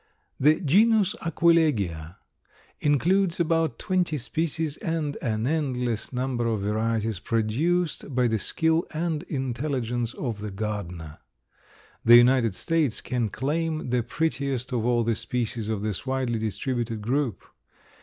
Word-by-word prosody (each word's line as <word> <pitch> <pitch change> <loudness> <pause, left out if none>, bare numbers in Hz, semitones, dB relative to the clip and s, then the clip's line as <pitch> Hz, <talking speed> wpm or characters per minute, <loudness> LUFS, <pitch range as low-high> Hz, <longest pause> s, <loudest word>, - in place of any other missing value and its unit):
The 150 +3 +4
genus 205 +5 +4
Aquilegia 130 - +1 0.6
includes 170 +5 +2
about 165 -6 +1
twenty 180 -6 0
species 155 +3 -2
and 160 -3 -2
an 110 -3 -1
endless 125 -6 -1
number 125 -2 -1
of 110 -3 0
varieties, 110 0 -1
produced 140 - -1
by 125 -1 +3
the 110 -2 +1
skill 160 - +1
and 160 -1 -1
intelligence 125 -4 -2
of 115 -6 -4
the 105 0 -5
gardener. 95 -6 -5 0.8
The 120 - +8
United 120 -4 +4
States 155 -5 0
can 120 -4 -2
claim 155 +3 -2
the 125 -1 +2
prettiest 135 -1 -2
of 120 -1 0
all 120 -1 +2
the 115 0 +1
species 115 -2 -3
of 105 -2 -2
this 105 -4 -3
widely 130 -3 -1
distributed 115 0 -2
group. 130 -2 -1
125 Hz, 125 wpm, -26 LUFS, 115-155 Hz, 0.8 s, The